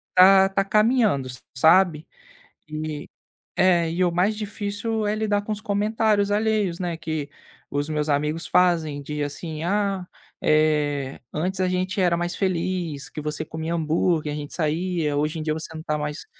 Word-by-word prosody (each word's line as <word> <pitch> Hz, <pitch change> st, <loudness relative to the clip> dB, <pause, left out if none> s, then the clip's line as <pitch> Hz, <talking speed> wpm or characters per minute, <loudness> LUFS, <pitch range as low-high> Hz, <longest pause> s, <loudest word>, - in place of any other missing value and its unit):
tá 190 Hz, +1 st, +7 dB
tá 195 Hz, 0 st, 0 dB
caminhando, 215 Hz, -, +3 dB, 0.3 s
sabe, 160 Hz, +2 st, +4 dB, 0.6 s
e 155 Hz, -1 st, -5 dB, 0.5 s
é, 170 Hz, -3 st, +3 dB
e 180 Hz, +2 st, +1 dB
o 175 Hz, -, +2 dB
mais 190 Hz, +5 st, +1 dB
difícil 210 Hz, +1 st, -3 dB
é 205 Hz, -, +1 dB
lidar 205 Hz, -2 st, 0 dB
com 215 Hz, -, -5 dB
os 210 Hz, 0 st, -3 dB
comentários 210 Hz, 0 st, +1 dB
alheios, 210 Hz, -4 st, +1 dB
né, 175 Hz, -2 st, -2 dB
que 155 Hz, -3 st, -4 dB, 0.4 s
os 145 Hz, +1 st, -1 dB
meus 150 Hz, 0 st, -1 dB
amigos 150 Hz, +3 st, 0 dB
fazem 165 Hz, -5 st, +2 dB
de, 150 Hz, +1 st, -4 dB
assim: 155 Hz, +2 st, -5 dB
"Ah, 195 Hz, -1 st, 0 dB, 0.3 s
eh, 150 Hz, -3 st, +1 dB
antes 185 Hz, +5 st, -2 dB
a 185 Hz, -, +2 dB
gente 185 Hz, +1 st, -1 dB
era 175 Hz, -1 st, +3 dB
mais 175 Hz, 0 st, -2 dB
feliz 175 Hz, -5 st, -2 dB
que 150 Hz, -, -6 dB
você 150 Hz, +1 st, -3 dB
comia 160 Hz, +2 st, -4 dB
hambúrguer 160 Hz, -1 st, 0 dB
a -, -, -4 dB
gente 145 Hz, 0 st, -6 dB
saía 160 Hz, -1 st, -1 dB
hoje 150 Hz, +3 st, 0 dB
em 155 Hz, -, -4 dB
dia 155 Hz, -1 st, 0 dB
você 160 Hz, +1 st, -5 dB
não 155 Hz, -, -7 dB
tá 150 Hz, -, -1 dB
mais, 150 Hz, +1 st, -4 dB
170 Hz, 170 wpm, -24 LUFS, 155-195 Hz, 0.6 s, tá